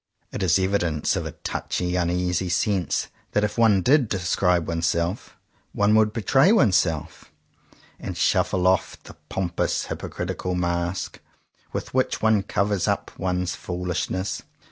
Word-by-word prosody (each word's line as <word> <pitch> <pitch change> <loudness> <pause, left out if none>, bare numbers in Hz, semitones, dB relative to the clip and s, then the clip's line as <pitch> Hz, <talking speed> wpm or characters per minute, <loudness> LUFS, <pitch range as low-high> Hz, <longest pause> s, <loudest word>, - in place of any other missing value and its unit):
It - - -5
is 90 -3 +4
evidence 95 -5 0
of - - -2
a - - -7
touchy, 90 0 -3
uneasy 90 +1 0
sense 90 0 0 0.2
that 105 - +2
if 105 0 -1
one 110 -5 +4
did 135 - +4
describe 90 -2 +1
oneself, 85 +3 -1 0.4
one 105 +1 +3
would 110 -1 +4
betray 135 - +3
oneself, 90 - +1 0.7
and - - -6
shuffle 90 -1 +1
off 95 0 +2
the - - -12 0.2
pompous 90 -3 -1
hypocritical 90 0 -4
mask 85 +1 -2 0.5
with - - -5
which 130 0 +1
one 110 -2 +3
covers 100 -1 0
up - - -1
one's 90 -1 -1
foolishness. 90 +1 -3
90 Hz, 130 wpm, -24 LUFS, 85-105 Hz, 0.7 s, is